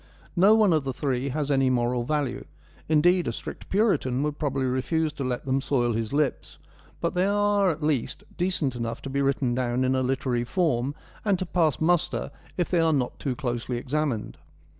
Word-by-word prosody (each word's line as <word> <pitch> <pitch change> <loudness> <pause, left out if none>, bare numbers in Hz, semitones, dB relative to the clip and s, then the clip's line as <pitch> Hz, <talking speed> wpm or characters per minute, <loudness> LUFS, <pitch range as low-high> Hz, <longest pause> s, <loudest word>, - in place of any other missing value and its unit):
No 195 +5 +6
one 215 -5 +4
of 155 -3 +2
the 135 -1 -3
three 130 0 -1
has 145 +1 -1
any 135 -1 +3
moral 120 -1 +1
value; 140 -1 -2 0.4
indeed, 175 +3 +4
a - - +1
strict - - -8
Puritan 190 - +1
would 150 0 -2
probably 135 -3 0
refuse 145 +5 0
to 140 - -4
let 125 0 -3
them 135 0 +1
soil 120 -4 +1
his 110 -1 -2
lips; 145 -1 -1 0.4
but 170 - -1
they 180 +2 +2
are 205 -1 +3
at 155 -2 -3
least 145 -2 -1
decent 175 -7 0
enough 115 -1 -4
to 135 - -5
be 140 +1 0
written 135 -2 +1
down 125 0 0
in 130 0 +2
a 130 - +1
literary 130 -2 0
form, 140 -3 0 0.3
and 205 -3 +2
to 185 - -3
pass 160 -7 +1
muster, 175 +1 +1 0.3
if 175 - +1
they 175 - +3
are 165 -1 +3
not 130 -4 -1
too 135 -3 -2
closely 120 -2 -3
examined. 135 -2 -2
140 Hz, 195 wpm, -26 LUFS, 125-165 Hz, 0.4 s, No